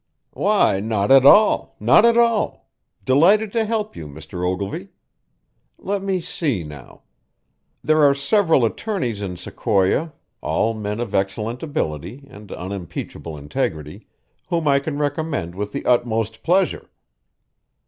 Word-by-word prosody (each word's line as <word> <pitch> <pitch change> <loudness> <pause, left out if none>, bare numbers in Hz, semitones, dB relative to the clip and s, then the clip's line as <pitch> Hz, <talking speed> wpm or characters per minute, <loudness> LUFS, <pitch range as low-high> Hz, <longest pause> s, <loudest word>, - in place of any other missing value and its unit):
"Why, 200 - +2
not 105 +1 -1
at 135 0 +7
all, 210 +7 +5
not - - +5
at 235 0 +4
all! 230 -3 +1 0.4
Delighted 195 +11 +4
to 225 0 0
help 215 -1 -2
you, 80 - -8
Mr. 80 +5 -8
Ogilvy. 95 +2 -3 0.9
Let 200 0 -3
me 190 -1 -1
see, 150 - -2
now. 75 -4 -12 0.8
There 155 0 +3
are 140 -1 +5
several 160 - +2
attorneys 125 - -3
in 90 -3 -5
Sequoia, 105 - 0 0.3
all 115 - 0
men 105 0 -4
of 120 -4 -4
excellent 105 +5 -2
ability 125 - -4
and 105 -5 -13
unimpeachable 90 -3 -7
integrity, 75 +1 -4 0.4
whom 165 -3 -1
I 140 -1 +4
can 145 +1 -5
recommend 145 - -2
with 105 +2 -5
the - - -5
utmost 115 -3 0
pleasure. 185 +3 0
120 Hz, 130 wpm, -21 LUFS, -, 0.9 s, at